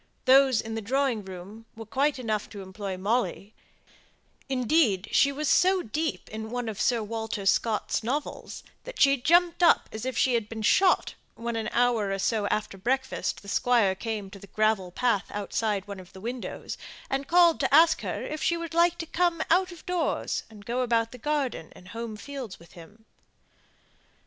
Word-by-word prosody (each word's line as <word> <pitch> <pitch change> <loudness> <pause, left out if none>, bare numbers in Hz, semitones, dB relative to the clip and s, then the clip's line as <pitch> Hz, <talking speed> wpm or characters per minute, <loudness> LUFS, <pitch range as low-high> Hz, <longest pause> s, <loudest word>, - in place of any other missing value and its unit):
Those 265 -2 +5
in 225 - -6
the 225 - -3
drawing 255 0 0
room 190 +4 -10
were 225 0 -8
quite 275 +6 0
enough 220 -4 -2
to 205 -2 -8
employ 190 0 -6
Molly; 215 +1 -1 1.0
indeed, 250 - +2
she 280 - +4
was 295 +2 -3
so 370 +5 +4
deep 310 +7 -3
in 220 +1 -6
one 245 0 -3
of 215 -3 -4
Sir 235 -3 +2
Walter 220 -1 -4
Scott's 215 +2 +1
novels 265 +7 -4 0.2
that - - -9
she 275 -1 +6
jumped 340 +6 +3 0.3
as 220 - -6
if 260 -2 -3
she 260 - +3
had 225 -3 0
been 220 -1 -6
shot, 375 - +3 0.2
when 235 0 -4
an 220 -1 -2
hour 235 -4 +2
or 195 - -1
so 205 +1 0
after 205 -2 -2
breakfast 265 +3 -2
the - - -13
Squire 230 -3 +2
came 205 -1 -5
to 200 - -11
the 200 - -13
gravel 215 -3 +1
path 230 0 +1
outside 205 -1 -2
one 200 -1 -7
of 185 -1 -14
the 190 - -11
windows, 240 +4 -6 0.3
and 270 0 -2
called 345 -1 +5
to 270 - 0
ask 320 +3 +6
her - - -4
if 305 0 -5
she 340 - +1
would 335 -1 -6
like 340 +1 +3
to 330 - -4
come 340 0 0
out 365 +2 +3
of 340 -2 -13
doors 360 -2 -1
and 210 -2 -14
go 245 +2 -1
about 230 -2 +1
the 250 - -11
garden 275 - -2
and 180 - -15
home 230 -1 -6
fields 260 -3 -7
with 170 0 -18
him. 205 +6 -15
230 Hz, 185 wpm, -27 LUFS, 210-280 Hz, 1.0 s, she